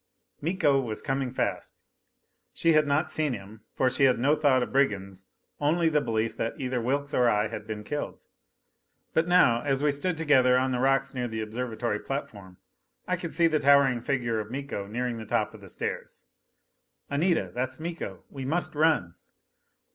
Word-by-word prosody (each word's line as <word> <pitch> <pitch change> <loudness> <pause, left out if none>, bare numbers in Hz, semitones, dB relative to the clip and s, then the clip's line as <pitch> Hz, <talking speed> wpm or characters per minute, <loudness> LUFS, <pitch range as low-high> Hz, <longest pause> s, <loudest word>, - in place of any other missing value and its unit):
Miko 145 -4 +2
was 110 -4 -4
coming 135 -1 -2
fast! 130 - -3 0.8
She 165 -1 +3
had 155 -1 +4
not 145 +4 +1
seen 155 -4 0
him; 105 0 -9
for 130 - +2
she 135 +2 +3
had 130 - +4
no 140 +6 +3
thought 140 -4 +3
of - - -7
brigands 100 -8 0 0.3
only 160 +3 +2
the 150 -1 +2
belief 110 -2 -1
that 115 - -2
either 130 -2 -1
Wilks 140 +4 -1
or 125 -1 +4
I 105 -1 +1
had 105 -1 -7
been 105 -1 -5
killed. 145 +6 -5 0.9
But 160 +1 +2
now, 175 -10 +5
as 135 0 0
we 150 - +4
stood 165 +5 -2
together 130 -5 +4
on 130 +1 +1
the 125 - -1
rocks 135 +1 +2
near 125 -2 -2
the 110 -1 -4
observatory 115 0 -3
platform, 100 -10 -6 0.5
I 180 - +1
could 170 -3 -6
see 170 0 +4
the 155 -2 +3
towering 140 -3 +4
figure 120 -4 -1
of 105 0 -5
Miko 130 -6 -5
nearing 120 +2 -2
the 110 - -7
top - - 0
of - - -13
the - - -12
stairs. - - -5 0.9
"Anita, 165 +4 +1
that's 130 +2 -3
Miko! 160 - -6
We 135 -2 -6
must 155 +3 -1
run!" 150 - +2
130 Hz, 180 wpm, -27 LUFS, 115-150 Hz, 0.9 s, now